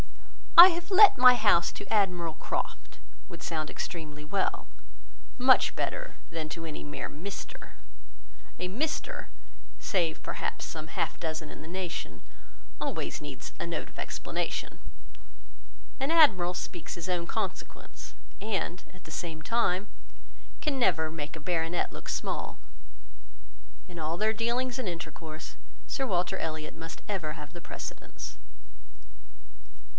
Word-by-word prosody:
"I 350 +2 +15
have 345 +1 -3
let 405 +2 +9
my 250 0 +9
house 205 -7 +4
to - - -8
Admiral 180 -6 +2
Croft," - - -4 0.3
would - - -9
sound 155 -2 -2
extremely 150 -3 -5
well; 190 +6 0 0.7
very 250 - -4
much 255 - +6
better - - -2 0.2
than 160 -2 -3
to 165 +2 -5
any 155 -2 -5
mere 145 0 -4
Mr.——; 200 - -7 0.9
a 180 - -1
Mr. 310 - -2 0.5
(save, 170 -5 0
perhaps, - - -3
some 155 -1 -6
half 170 -2 -2
dozen 160 -2 -3
in - - -9
the 155 - -9
nation,) 180 0 -4 0.6
always - - -2
needs - - -7
a - - -2
note - - -3
of - - -19
explanation. - - -3 1.2
An 270 +2 0
admiral 190 - +6
speaks 175 -2 -5
his 170 0 -5
own 175 -2 0
consequence, - - -5 0.3
and, 195 -4 -2
at 185 - -16
the 160 - -10
same 160 -1 -4
time, 210 -3 +2 0.7
can 295 -3 0
never 160 -8 +3
make 150 -1 -5
a - - -7
baronet 165 +1 0
look - - -8
small. - - -2 1.3
In 175 -2 -8
all 160 +2 -1
their 215 +3 +3
dealings 240 +3 0
and 255 - -2
intercourse, 165 -1 -7 0.3
Sir 270 - -1
Walter 180 -4 +1
Elliot 155 -1 -4
must 165 0 -8
ever 175 -7 -2
have 150 -1 -9
the 175 - -8
precedence. - - -7
175 Hz, 135 wpm, -30 LUFS, 160-220 Hz, 1.3 s, I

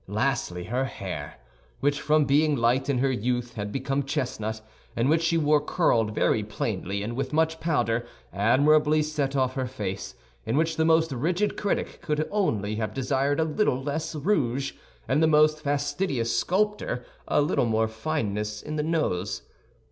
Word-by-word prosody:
Lastly, 105 -5 -1
her 125 +8 -1
hair, 120 - -6 0.4
which, 145 0 +1
from 150 +1 +3
being 150 +2 +3
light 125 +3 +1
in 140 - +2
her 135 +2 +2
youth, 120 0 -1
had 105 -2 -4
become 135 +2 -1
chestnut, 110 -5 -3 0.4
and 115 +2 +1
which 160 +1 +3
she 165 0 +2
wore 150 -1 +3
curled 115 -10 +1
very - - +2
plainly, 100 +2 -3
and 115 +3 -4
with 135 +1 -2
much 160 +1 +1
powder, 120 -8 0 0.3
admirably 150 +8 +4
set 145 -3 -2
off 130 -1 +1
her 130 -1 -2
face, 100 -6 -5 0.3
in 115 - -1
which 160 +1 +1
the 160 - +2
most 160 -1 +3
rigid 170 - 0
critic 205 - -2
could 155 0 -1
only 110 - 0
have 110 -1 -3
desired 135 +2 0
a - - +4
little 160 -4 +1
less 145 +4 -3
rouge, 140 - 0 0.3
and 135 +4 +2
the 160 - +5
most 155 0 +4
fastidious 145 -3 -1
sculptor 205 -9 0 0.2
a - - +2
little 145 -4 +2
more 110 0 +2
fineness 105 -4 -3
in 155 0 -4
the - - +1
nose. 150 - -1
140 Hz, 165 wpm, -26 LUFS, 115-155 Hz, 0.4 s, the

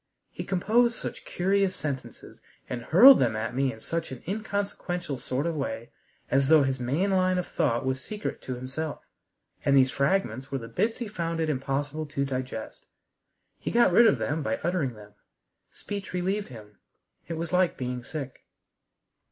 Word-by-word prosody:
He - - -6
composed 235 +6 +2
such - - -6
curious 195 +1 +1
sentences, 140 -6 -6 0.3
and 125 -2 -4
hurled 235 - +8
them 115 -3 +2
at 115 +2 -3
me 135 +1 +1
in 110 - -11
such 165 +6 -3
an 130 - -8
inconsequential 195 - -3
sort 130 +4 -2
of 170 -1 -1
way, 115 -5 -4 0.4
as 135 0 +3
though 155 -2 +7
his 135 -1 -1
main 145 +11 0
line 185 -1 +3
of 180 - -1
thought 125 -2 0
was 130 0 -1
secret 210 0 -5
to 130 - -4
himself, 135 +5 -5 0.6
and 140 0 +4
these 130 -1 +5
fragments 140 - 0
were 135 - 0
the 115 -3 -7
bits 215 - 0
he 240 - -4
found 170 -5 -3
it 160 -1 +1
impossible 145 +3 -2
to 140 -1 -1
digest. 130 -4 -5 0.7
He - - -3
got 235 -5 +4
rid 235 +5 +7
of 140 - +4
them 145 +8 -1
by 110 -5 -1
uttering 160 -8 0
them. 105 -1 -14 0.6
Speech 200 -2 -6
relieved 190 +3 -1
him. 105 -4 -13 0.5
It 165 - -3
was 165 +2 -4
like 180 -1 +3
being 125 -1 -3
sick. 135 -2 -7
145 Hz, 175 wpm, -27 LUFS, 130-185 Hz, 0.7 s, hurled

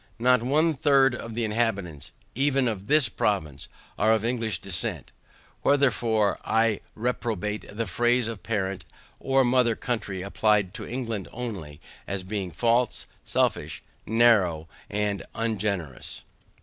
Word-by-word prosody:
Not 125 +1 +4
one 155 +6 +2
third 135 -2 +4
of 115 -2 -6
the 120 - -1
inhabitants, 100 -9 -2 0.2
even 135 0 +2
of 105 -4 -3
this 150 -2 +5
province, 80 -9 -2 0.3
are 110 +2 +4
of 110 0 0
English 115 -5 -1
descent. 90 -2 -1 0.5
Wherefore 120 -7 +2
I 110 -1 +2 0.2
reprobate 110 -3 -2
the 115 +3 -3
phrase 120 +5 +1
of 115 -4 -6
parent 95 -4 -2 0.4
or 135 0 +3
mother 120 -2 +3
country 110 -7 -3
applied 100 -1 +1
to - - -7
England 115 -6 -4
only, 95 -12 -6 0.3
as 95 0 -3
being 95 -1 -3
false, 120 +6 +1 0.2
selfish, - - -1 0.2
narrow 105 -9 +3 0.2
and 105 -1 -1
ungenerous. 100 - -3
110 Hz, 125 wpm, -26 LUFS, 100-120 Hz, 0.5 s, this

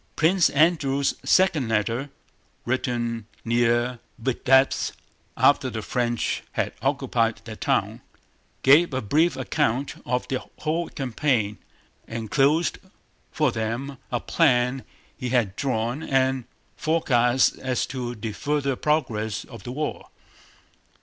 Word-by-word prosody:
Prince 170 +3 +4
Andrew's 140 -3 +2
second 170 -9 +3
letter, 115 +5 0 0.6
written 120 -3 -2 0.2
near 120 +1 +1 0.2
Vítebsk 130 +2 +2 0.4
after - - +4
the - - -5
French 120 -2 -1
had - - -1
occupied - - 0
that - - -9
town, - - 0 0.6
gave 145 +2 +5
a 130 - 0
brief 155 +11 +2
account 130 0 0
of 125 0 -1
the 130 -1 -2 0.2
whole 165 +2 -1
campaign, 125 -5 -1 0.5
enclosed 135 +8 +1 0.5
for - - +1
them 120 +5 -3
a 120 - 0
plan 125 -4 +2 0.3
he 125 - -4
had 115 -6 +1
drawn 125 0 -1
and 130 -3 +1 0.3
forecasts 130 -6 +2
as 130 -1 -1
to 125 -2 -5
the 110 0 -5
further 140 +3 -1
progress 110 -8 -1
of 115 - -11
the 120 - -7
war. 150 +3 -4
130 Hz, 115 wpm, -24 LUFS, 120-145 Hz, 0.6 s, gave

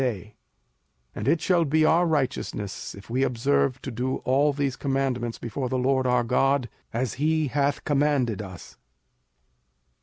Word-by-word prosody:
05:006:025 110 -5 -2 0.8
And 105 - -5
it 160 +3 +3
shall 175 -2 +3
be 155 +1 +2
our 170 +3 +4
righteousness, 130 - -2
if 100 +3 -12
we 130 +2 +1
observe 115 - +1
to 135 - -4
do 125 +3 -2
all 140 +3 +3
these 140 -2 -1
commandments 135 -4 -1
before 125 +2 -4
the 130 - 0
LORD 130 0 +1
our 125 -1 +3
God, 130 +1 +1 0.2
as 120 -1 -1
he 155 -1 +2
hath 140 +1 0
commanded 140 -7 +1
us. 95 -3 -11
130 Hz, 150 wpm, -25 LUFS, 120-145 Hz, 0.8 s, our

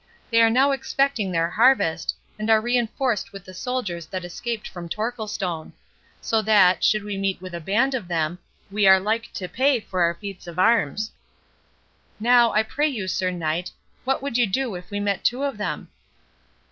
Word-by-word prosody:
They 230 0 +5
are 225 - +6
now 265 +5 +4
expecting 270 -6 0
their 165 0 0
harvest, 210 -8 +3 0.2
and 215 +1 -2
are 220 -1 +6
reinforced 240 0 0
with 195 -1 -10
the 185 - -11
soldiers 185 -6 -3
that 185 +1 -5
escaped 225 +5 -4
from 175 -2 -8
Torquilstone. 210 -6 -3 0.5
So 225 -1 +1
that, 195 -4 +4
should 215 -1 +3
we 205 -1 -4
meet 195 -1 -1
with 185 -1 -9
a 170 - -4
band 225 - +1
of 235 -9 -3
them, 170 0 -1 0.3
we 205 -1 +3
are 190 0 +8
like 220 +4 -2
to 185 - -4
pay 260 +7 +2
for 185 -4 -3
our 170 0 +3
feats 195 -1 -9
of 170 0 -8
arms.—Now, 225 - 0
I 215 - +3
pray 290 +7 0
you, 225 -10 -3
Sir 185 0 0
Knight, 175 0 -2 0.3
what 270 +1 -1
would 280 -4 -1
you 240 - +4
do 240 +3 -1
if 180 0 -8
we 205 - -3
met 205 -1 -1
two 250 +3 +1
of 275 -7 -2
them?" 205 - -3
210 Hz, 185 wpm, -24 LUFS, 180-235 Hz, 0.5 s, are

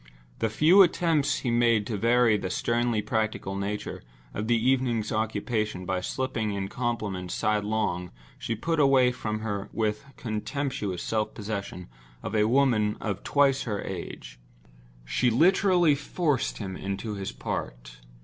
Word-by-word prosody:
The 115 - +1
few 160 - +6
attempts 165 -5 +2
he 125 - -1
made 115 -3 +3
to 110 - -3
vary 115 +1 +4
the 95 -3 -2
sternly 120 +2 0
practical 110 -3 -2
nature 100 +1 -4 0.3
of 105 +2 -3
the 120 0 +3
evening's 120 -2 +1
occupation 110 -2 -1
by 95 0 -1
slipping 110 0 -2
in 95 -1 -3
compliments 105 -7 -3
sidelong 105 -4 0 0.3
she 115 - -2
put 165 +8 -1
away 135 -3 +5
from 110 -3 -4
her 105 -3 -3
with 105 0 -1
the 140 0 -19
contemptuous 110 - -3
self 110 -1 -1
possession 100 -4 -5 0.4
of - - -4
a 105 0 +3
woman 115 -5 +2
of 100 -3 -3
twice 140 -1 +3
her 105 -2 -2
age. - - -7 0.7
She 125 - +1
literally 175 - +4
forced 145 -1 -1
him 95 -3 -5
into 100 +3 -4
his 100 -1 -4
part. - - -6
110 Hz, 145 wpm, -27 LUFS, 100-125 Hz, 0.7 s, few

